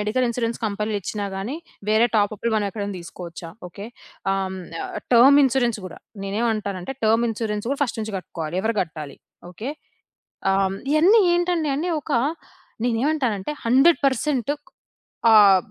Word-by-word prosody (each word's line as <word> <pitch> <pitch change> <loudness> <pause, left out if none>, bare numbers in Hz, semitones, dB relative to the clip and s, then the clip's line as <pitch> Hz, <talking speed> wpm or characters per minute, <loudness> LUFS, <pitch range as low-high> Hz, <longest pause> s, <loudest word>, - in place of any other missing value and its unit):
Medical 215 +5 +1
insurance 235 -1 -2
కంపెనీలిచ్చినా 210 0 -3
గాని, 225 +10 -4 0.3
వేరే 220 +2 +4
టాపప్పులు 215 +2 0
మనం 205 - 0
ఎక్కడైనా 205 -1 -4
తీసుకోవచ్చా? 170 0 -9 0.2
ఓకే. 200 +4 -9 0.5
ఆహ్, 195 0 0
హ్మ్, 190 0 -6 0.3
ఆహ్, - - -9 0.2
టర్మ్ 270 +4 +8
ఇన్‌సూరెన్స్ 240 -3 +1
గూడా. 185 - -8 0.3
నేనేమంటానంటే, 210 0 -2
టర్మ్ 225 +2 +3
ఇన్‌సూరెన్స్ 210 -1 -3
గూడా 280 +1 -2
ఫస్ట్ 240 - -5
నుంచి 215 -1 -4
కట్టుకోవాలి. 165 -1 -6
ఎవరు 225 0 0
కట్టాలి? 155 -4 -5 0.3
ఓకే. 215 +9 -5 0.8
ఆహ్, 195 - +2
హ్మ్, 195 - -5 0.2
ఇవన్నీ 370 +9 +6
ఏంటండి 345 -3 +1
అని 330 +5 -2
ఒక - - -6 0.7
నేనేమంటానంటే 245 -2 0
100% 270 0 +3
ఒక్ 295 - -41 0.7
ఆహ్, 200 -3 +8
220 Hz, 140 wpm, -23 LUFS, 200-260 Hz, 0.8 s, టర్మ్